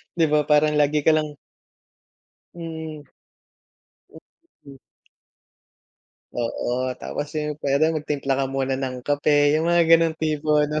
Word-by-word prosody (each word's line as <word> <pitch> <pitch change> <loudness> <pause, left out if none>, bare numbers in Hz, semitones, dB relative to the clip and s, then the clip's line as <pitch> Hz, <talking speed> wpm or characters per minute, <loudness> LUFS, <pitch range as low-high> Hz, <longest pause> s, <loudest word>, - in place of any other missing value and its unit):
'di 165 -2 +3
ba? 150 -1 +2
Parang 150 0 +3
lagi 150 0 +2
ka 160 - +5
lang 155 -1 0 1.2
Mm. 160 -3 -7 1.1
Hmm, - - -14 0.5
hmm. 140 -1 -13 1.6
Oo. 125 +2 -2
Tapos 145 - -5
yung, 150 -1 -3
pwede 145 +4 +2
magtimpla 145 -3 -2
ka 135 - +1
muna 135 0 -1
ng 130 -2 -5
kape, 145 0 +2
yung 160 +2 +1
mga 170 0 +4
ganong 165 -1 +4
tipo, 155 -1 0
ano? 150 +1 -1
150 Hz, 130 wpm, -23 LUFS, 140-155 Hz, 1.6 s, ka